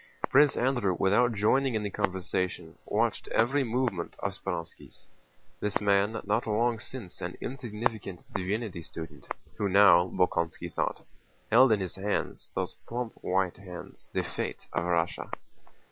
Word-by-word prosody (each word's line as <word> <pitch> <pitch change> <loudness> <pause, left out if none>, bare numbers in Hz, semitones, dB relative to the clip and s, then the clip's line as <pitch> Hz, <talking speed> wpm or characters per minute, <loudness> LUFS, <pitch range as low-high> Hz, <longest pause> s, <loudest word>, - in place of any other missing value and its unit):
Prince 145 +1 +6
Andrew 120 -7 +2
without 115 +5 +4
joining 120 +5 +2
in 110 - 0
the 100 - -3
conversation 90 -4 -2
watched 115 +2 0
every 135 +5 +2
movement 120 -7 -1
of - - -2
Speránski's: 85 -1 -6 0.5
this 105 0 +1
man, 100 +2 +2
not 105 +2 0
long 115 +2 +2
since 110 -5 -7
an - - -4
insignificant 110 -6 -3
divinity 100 -1 -2
student, 80 0 -9 0.3
who 100 - 0
now, 95 -2 +7
Bolkónski 85 -3 0
thought, - - -2 0.5
held 125 +2 +7
in 105 -2 +3
his 95 - -3
hands—those 100 +1 -3
plump 120 -1 -3
white 95 -1 0
hands—the 90 -3 -6
fate - - -4
of 85 - 0
Russia. 85 -1 0
105 Hz, 130 wpm, -29 LUFS, 90-115 Hz, 0.5 s, now